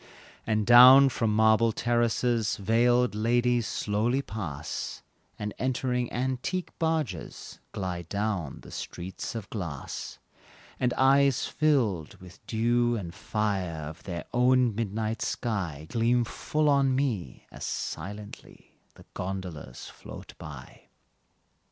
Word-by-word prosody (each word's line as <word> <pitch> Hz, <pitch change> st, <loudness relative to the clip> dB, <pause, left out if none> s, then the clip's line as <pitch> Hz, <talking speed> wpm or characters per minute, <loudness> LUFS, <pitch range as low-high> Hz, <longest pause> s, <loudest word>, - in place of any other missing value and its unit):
And 110 Hz, -1 st, +1 dB
down 130 Hz, +4 st, +9 dB
from 115 Hz, -3 st, 0 dB
marble 110 Hz, +1 st, +4 dB
terraces 120 Hz, -1 st, +1 dB
Veiled 120 Hz, +4 st, +3 dB
ladies 120 Hz, +1 st, +1 dB
slowly 110 Hz, +7 st, 0 dB
pass, 75 Hz, -, -5 dB, 0.3 s
And, 105 Hz, 0 st, -4 dB
entering 125 Hz, -1 st, -1 dB
antique 130 Hz, +9 st, -2 dB
barges, 155 Hz, -, -3 dB
Glide 90 Hz, -3 st, -4 dB
down 100 Hz, -8 st, -2 dB
the -, -, -13 dB
streets 90 Hz, +5 st, -6 dB
of 110 Hz, -4 st, -5 dB
glass; 85 Hz, -10 st, -5 dB, 0.6 s
And 125 Hz, -1 st, +1 dB
eyes 135 Hz, 0 st, +4 dB
filled 120 Hz, -, +1 dB
with 90 Hz, 0 st, -13 dB
the 110 Hz, -, -4 dB
dew 120 Hz, +1 st, +2 dB
and 90 Hz, -6 st, -5 dB
fire 95 Hz, -6 st, -2 dB
Of 80 Hz, +2 st, -9 dB
their 85 Hz, -3 st, -6 dB
own 125 Hz, -1 st, +4 dB
midnight 110 Hz, +1 st, -2 dB
sky, 90 Hz, -, -3 dB
Gleam 120 Hz, +4 st, +2 dB
full 150 Hz, +5 st, -1 dB
on 140 Hz, -2 st, +3 dB
me, 115 Hz, -, -2 dB
as -, -, -9 dB
silently 105 Hz, +1 st, -7 dB, 0.2 s
The -, -, -16 dB
gondolas 90 Hz, -9 st, -6 dB
float -, -, -11 dB
by. -, -, -11 dB
115 Hz, 115 wpm, -28 LUFS, 95-125 Hz, 0.6 s, down